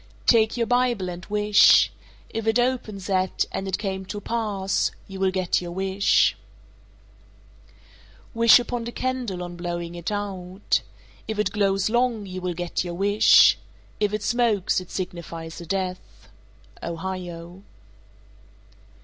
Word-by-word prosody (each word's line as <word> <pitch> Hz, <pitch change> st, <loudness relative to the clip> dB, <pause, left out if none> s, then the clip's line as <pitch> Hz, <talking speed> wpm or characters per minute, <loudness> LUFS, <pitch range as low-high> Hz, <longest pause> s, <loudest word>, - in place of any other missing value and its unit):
Take 225 Hz, -1 st, +4 dB
your 235 Hz, -, +1 dB
Bible 245 Hz, -5 st, +1 dB
and 175 Hz, 0 st, -7 dB
wish. 210 Hz, 0 st, +5 dB, 0.4 s
If 225 Hz, 0 st, -4 dB
it 225 Hz, +1 st, +3 dB
opens 240 Hz, -6 st, -1 dB
at 190 Hz, -1 st, 0 dB
"and 195 Hz, -, -4 dB
it 190 Hz, -, -1 dB
came 190 Hz, -2 st, -3 dB
to 205 Hz, -, -5 dB
pass," 205 Hz, -3 st, -1 dB, 0.2 s
you 195 Hz, -1 st, -8 dB
will 190 Hz, 0 st, +2 dB
get 185 Hz, -1 st, 0 dB
your 175 Hz, -1 st, -6 dB
wish. 190 Hz, +1 st, +2 dB, 2.0 s
433. 230 Hz, -, -9 dB
Wish 230 Hz, +1 st, +8 dB
upon 240 Hz, -1 st, -4 dB
a -, -, -4 dB
candle 245 Hz, -9 st, -3 dB
on 175 Hz, 0 st, -7 dB
blowing 175 Hz, -1 st, -4 dB
it 175 Hz, +3 st, -5 dB
out. 195 Hz, -2 st, -2 dB, 0.5 s
If 220 Hz, -1 st, -3 dB
it 210 Hz, -, 0 dB
glows 195 Hz, -1 st, +1 dB
long, 240 Hz, -3 st, +1 dB
you 185 Hz, -1 st, -6 dB
will 180 Hz, -1 st, -3 dB
get 175 Hz, +1 st, -2 dB
your 175 Hz, -1 st, -5 dB
wish. 205 Hz, +3 st, +5 dB, 0.4 s
If 210 Hz, -1 st, +1 dB
it 210 Hz, 0 st, -3 dB
smokes, 220 Hz, -6 st, +1 dB
it 185 Hz, -, -12 dB
signifies 170 Hz, -2 st, -6 dB
a 170 Hz, -, -10 dB
death. 185 Hz, 0 st, -4 dB, 0.5 s
_Ohio. 175 Hz, 0 st, -6 dB
195 Hz, 140 wpm, -24 LUFS, 180-220 Hz, 2.0 s, Wish